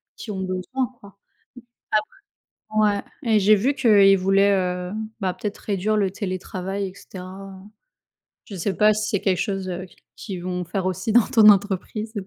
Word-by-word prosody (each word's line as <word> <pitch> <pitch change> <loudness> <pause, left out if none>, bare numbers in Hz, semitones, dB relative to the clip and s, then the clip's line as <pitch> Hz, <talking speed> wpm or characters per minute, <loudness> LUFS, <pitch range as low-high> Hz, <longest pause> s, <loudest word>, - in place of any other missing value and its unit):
qui 220 - -7
ont 190 -2 -4
besoin 190 +8 -2
quoi. 200 - -14
Mmh. - - -23 1.7
Après 210 -1 +4
ouais, 200 - -4 0.3
et - - +6
j'ai 205 +2 +6
vu 245 +8 +1
qu'ils 200 -7 +5
voulaient, 195 +2 +3 0.4
heu, - - -7 0.3
bah, 190 -2 0
peut-être 210 -1 -5
réduire 210 +1 -1
le 200 -3 +1
télétravail 190 0 -4
et 185 - -12
cetera, 190 0 -10
heu, 190 +1 -13 0.8
je 200 - -9
sais 190 +2 -2
pas 215 0 +5
si 215 +1 -2
c'est 200 -4 -1
quelque 185 -3 +1
chose, 195 -3 -2
heu, 180 +1 -5
q 185 - -19 0.2
qu'ils 185 -5 -7
vont 180 0 -3
faire 185 +3 -3
aussi 185 +5 -2
dans 240 -1 +6
ton 215 -2 +7
entreprise. 205 +2 +1
195 Hz, 180 wpm, -23 LUFS, 185-210 Hz, 1.7 s, ton